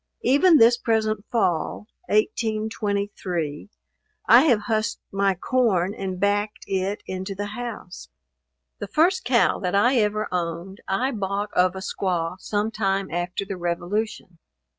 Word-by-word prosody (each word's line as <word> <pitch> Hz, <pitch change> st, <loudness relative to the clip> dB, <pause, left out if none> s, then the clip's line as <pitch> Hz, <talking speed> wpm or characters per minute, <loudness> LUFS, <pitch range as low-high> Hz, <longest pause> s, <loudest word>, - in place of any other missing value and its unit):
Even 320 Hz, +4 st, +5 dB
this 235 Hz, -1 st, +6 dB
present 220 Hz, -3 st, 0 dB
fall 180 Hz, -4 st, 0 dB, 0.2 s
(1823) 205 Hz, -7 st, -1 dB, 0.6 s
I -, -, +8 dB
have 240 Hz, -8 st, +3 dB
husked 215 Hz, 0 st, -1 dB
my 195 Hz, -1 st, +1 dB
corn 200 Hz, -3 st, +1 dB
and 190 Hz, -2 st, -5 dB
backed 205 Hz, +1 st, 0 dB
it 195 Hz, +1 st, -2 dB
into 190 Hz, +1 st, -5 dB
the 205 Hz, +2 st, -3 dB
house. 210 Hz, -, -7 dB, 0.7 s
The 205 Hz, -, -5 dB
first 350 Hz, -, +2 dB
cow 245 Hz, -2 st, +2 dB
that 180 Hz, 0 st, -1 dB
I 245 Hz, +6 st, +4 dB
ever 215 Hz, -1 st, +1 dB
owned, 175 Hz, +2 st, -4 dB
I 250 Hz, +8 st, 0 dB
bought 205 Hz, -1 st, -3 dB
of 180 Hz, 0 st, +3 dB
a 190 Hz, -, -6 dB
squaw 180 Hz, -2 st, -2 dB
sometime 205 Hz, -2 st, -1 dB
after 175 Hz, +3 st, -3 dB
the 195 Hz, -1 st, -5 dB
revolution. 175 Hz, +1 st, -3 dB
205 Hz, 130 wpm, -24 LUFS, 185-220 Hz, 0.7 s, I